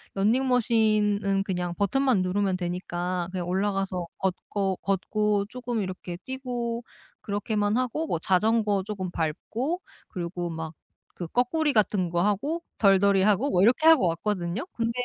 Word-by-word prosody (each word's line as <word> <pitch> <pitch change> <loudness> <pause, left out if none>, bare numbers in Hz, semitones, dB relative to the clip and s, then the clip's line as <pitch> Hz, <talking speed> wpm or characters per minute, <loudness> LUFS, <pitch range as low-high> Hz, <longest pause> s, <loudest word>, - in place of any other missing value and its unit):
러닝 230 +7 +2
머신은 210 -5 +2
그냥 180 -3 -3
버튼만 235 0 +2
누르면 190 0 0
되니까 175 0 -3
그냥 180 -2 -3
올라가서 190 -2 -1
걷고 190 0 -2
걷고 200 +1 0
쪼끔 240 -4 -3
이렇게 185 -1 -6
뛰고 245 -3 -3 0.4
그렇게만 205 +1 -1
하고 255 +6 -1
뭐 - - 0
자전거 205 +3 +2
쪼금 190 -4 -4
밟고 235 - -2 0.3
그리고 175 -1 -4
막 160 -1 -5 0.4
그 175 - -6
꺼꾸리 290 - +1
같은 200 -5 +2
거 175 0 0
하고 280 - 0 0.2
덜덜이 195 -1 +5
하고 210 +7 +2
뭐 180 - +3
이렇게 250 +9 +4
하고 320 - +7
왔거든요. 175 - -2
근데 230 0 -1
200 Hz, 305 characters per minute, -26 LUFS, 185-230 Hz, 0.4 s, 하고